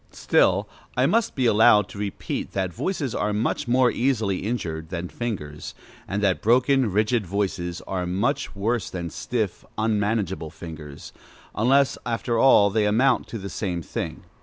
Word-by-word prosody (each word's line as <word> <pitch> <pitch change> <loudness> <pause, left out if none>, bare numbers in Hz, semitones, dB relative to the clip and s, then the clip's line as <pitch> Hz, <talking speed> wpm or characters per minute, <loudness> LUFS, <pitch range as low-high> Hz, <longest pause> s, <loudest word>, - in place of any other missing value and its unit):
Still, - - +2 0.3
I - - +4
must 230 -1 +1
be 130 - +1
allowed 105 -2 +5
to 100 - -9
repeat 100 -1 -4
that 95 -2 -2
voices 145 - -2
are 105 - -1
much 110 +3 -1
more 125 0 +4
easily 115 -7 0
injured 80 -8 -3
than 90 -1 -4
fingers; 80 -12 -5 0.3
and 100 +1 -2
that 95 -3 +2
broken, 125 +1 +3
rigid 105 +1 +1
voices 90 -2 -2
are 90 -2 -3
much 100 +8 -1
worse 110 +1 -1
than 85 -2 -5
stiff, 110 -6 -3
unmanageable 105 -6 0
fingers, 75 -3 -10 0.4
unless, 135 +5 +3
after 115 0 -1
all, 105 -6 +6
they 105 0 +2
amount 125 +5 +2
to 115 - -6
the 100 -2 -6
same 90 -2 -3
thing. - - -5
105 Hz, 155 wpm, -24 LUFS, 90-120 Hz, 0.4 s, all